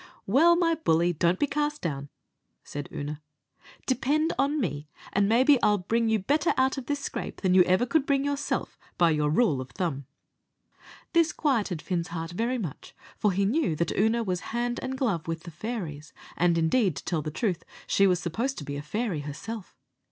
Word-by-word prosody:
"Well, 315 - +5
my 340 -1 +2
bully, 175 - +2
don't 170 +3 +2
be - - +2
cast 295 +1 -1
down," 140 -4 -3 0.5
said 145 0 -6
Oonagh; 145 +1 -5 0.6
"depend 290 +5 +1
on 285 +2 +1
me, 150 - -3 0.2
and 200 +1 +3
maybe 255 +3 +5
I'll 210 0 +4
bring 225 +5 0
you 220 - +3
better 290 - +1
out 265 0 +3
of 255 - -10
this 285 -1 -1
scrape - - -5
than 185 -2 +2
ever 185 +6 +3
you - - -1
could 290 +2 +1
bring 275 -1 +2
yourself, 285 0 -2 0.2
by 170 -2 +4
your 150 -1 +1
rule 155 - +2
o' - - -5
thumb." 140 -2 -4 1.1
This 335 -2 +4
quieted 215 - 0
Fin's 175 -2 -2
heart 165 -1 -5
very 235 +8 -1
much, 175 - -7 0.2
for 210 - +1
he 195 +2 +1
knew 250 - +1
that 170 +2 -1
Oonagh 225 +3 +2
was 180 -2 -1
hand 240 +1 -1
and 260 0 -4
glove 195 - -1
with 165 0 -3
the 175 - -9
fairies; 165 -5 -6 0.2
and, 170 -1 +2
indeed, 165 - +2
to - - -8
tell 165 -3 -1
the 155 - -4
truth, 180 +2 -2 0.2
she 195 - +4
was 180 -2 +2
supposed 230 +10 -2
to - - -5
be 145 0 -5
a - - -4
fairy 195 +3 -2
herself. 185 +9 -7
200 Hz, 195 wpm, -27 LUFS, 165-260 Hz, 1.1 s, Well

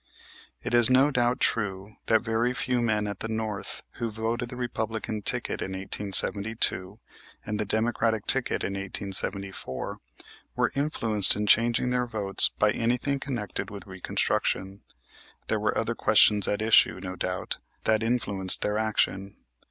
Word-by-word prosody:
It - - -4
is 120 -1 +5
no 130 +3 +4
doubt 125 -1 +1
true 105 -2 -2
that 110 0 +3
very 120 +2 -1
few 125 -1 -1
men 105 -2 0
at 100 0 -5
the - - -4
North 110 -2 -5 0.2
who 115 - -2
voted 115 +2 -3
the 125 - -8
Republican 110 -3 -4
ticket - - -1
in 95 - -4
1872 100 +1 +1 0.5
and 105 0 -4
the 105 - -1
Democratic 110 0 0
ticket 135 -1 +1
in 100 - -3
1874 95 -5 -3 0.6
were - - +1
influenced 115 -8 +3
in 105 +1 -2
changing 120 +3 +3
their 125 0 0
votes 105 -4 +3
by 105 0 +3
anything 125 +5 -1
connected 120 -9 -4
with 100 -3 -9
Reconstruction. 95 +1 -2 0.7
There - - 0
were - - -1
other - - -1
questions 105 -2 +4
at 105 +1 -1
issue, 110 -3 +4
no 90 -1 -6
doubt, 90 0 -4 0.2
that 110 0 +2
influenced 100 -5 +1
their 105 +1 -1
action. 100 -3 -1
110 Hz, 145 wpm, -26 LUFS, 100-120 Hz, 0.7 s, is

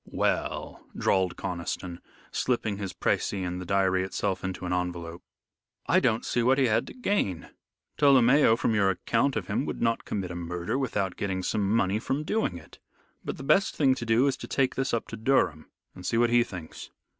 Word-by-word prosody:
"Well," - - -2
drawled 95 -2 +1
Conniston, 90 -1 -4 0.3
slipping 115 -5 -1
his 100 -2 -4
precis - - 0
and 90 +1 -4
the 90 - -8
diary 95 -1 +2
itself 95 0 -2
into 95 -1 -4
an 90 - -1
envelope, 85 -2 -3 0.6
"I - - +4
don't 110 0 +1
see 120 - 0
what 130 +3 +3
he 135 - +4
had 115 -1 +1
to - - -10
gain. 200 - -1 0.5
Tolomeo, 135 -3 +6
from 115 - 0
your 100 -2 +3
account 115 +8 0
of 105 -5 -2
him, - - -1
would - - -4
not 115 -1 +1
commit 95 -3 -4
a - - -6
murder 90 +7 -3
without 105 -8 -2
getting 95 -2 -2
some 100 +1 0
money 100 -1 +2
from 135 +6 -2
doing 155 - -1
it. 80 - -15 0.4
But - - -4
the - - -8
best 195 +8 +3
thing 135 -3 +4
to 130 - -5
do, 115 +4 +4
is 135 -2 +1
to - - -8
take 135 -2 +1
this 135 - -1
up 115 - -1
to - - -6
Durham 110 - +1 0.2
and 90 - -11
see 115 - 0
what 120 0 +3
he 120 0 +5
thinks." 90 -7 -9
105 Hz, 200 wpm, -27 LUFS, 90-125 Hz, 0.6 s, Tolomeo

